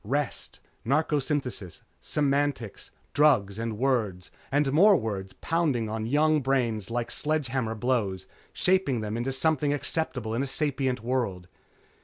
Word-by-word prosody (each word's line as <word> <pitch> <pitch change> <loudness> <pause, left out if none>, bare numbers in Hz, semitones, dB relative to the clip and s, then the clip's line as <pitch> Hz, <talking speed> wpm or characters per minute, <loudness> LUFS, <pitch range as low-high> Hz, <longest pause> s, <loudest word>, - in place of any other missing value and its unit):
Rest, 140 +4 -3 0.2
narcosynthesis. 140 - -1 0.2
Semantics. 140 -6 -1 0.2
Drugs 110 -9 +3
and 115 -2 -3
words 110 -8 0 0.2
and 140 0 +2
more 200 +6 +7
words 100 -6 -4
pounding 145 -10 0
on 110 0 -3
young 150 +3 +3
brains 120 -7 0
like 120 0 -2
sledgehammer 135 -7 -1
blows, 105 -6 -1 0.3
shaping 180 - +1
them 105 0 -3
into 120 +3 -1
something 145 +1 +1
acceptable 140 -6 -2
in 120 - 0
a 140 - -1
sapient 135 -3 -1
world. 115 -8 -2
130 Hz, 125 wpm, -27 LUFS, 110-145 Hz, 0.3 s, more